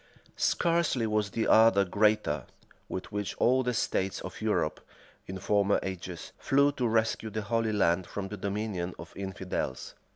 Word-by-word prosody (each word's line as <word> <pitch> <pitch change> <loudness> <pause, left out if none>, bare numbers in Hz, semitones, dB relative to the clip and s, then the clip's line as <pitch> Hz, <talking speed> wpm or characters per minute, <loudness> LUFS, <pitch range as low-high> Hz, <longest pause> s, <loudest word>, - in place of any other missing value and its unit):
Scarcely 170 -8 +2
was 105 -1 0
the 115 +2 -1
ardor 110 -3 +6
greater, 105 - +1 0.4
with 95 - -5
which 105 -1 -3
all 130 +2 +4
the 125 -1 -1
states 95 -2 0
of - - -8
Europe, - - 0 0.5
in 95 - -5
former 100 +1 +2
ages, 90 -2 -6
flew 140 +1 +3
to 125 -4 -1
rescue 110 0 +1
the 110 0 -3
Holy 115 +1 0
Land 90 -3 +2
from 95 -1 -5
the 105 - -6
dominion 100 -3 -3
of - - -10
infidels. 95 -1 -4
105 Hz, 155 wpm, -29 LUFS, 95-115 Hz, 0.5 s, ardor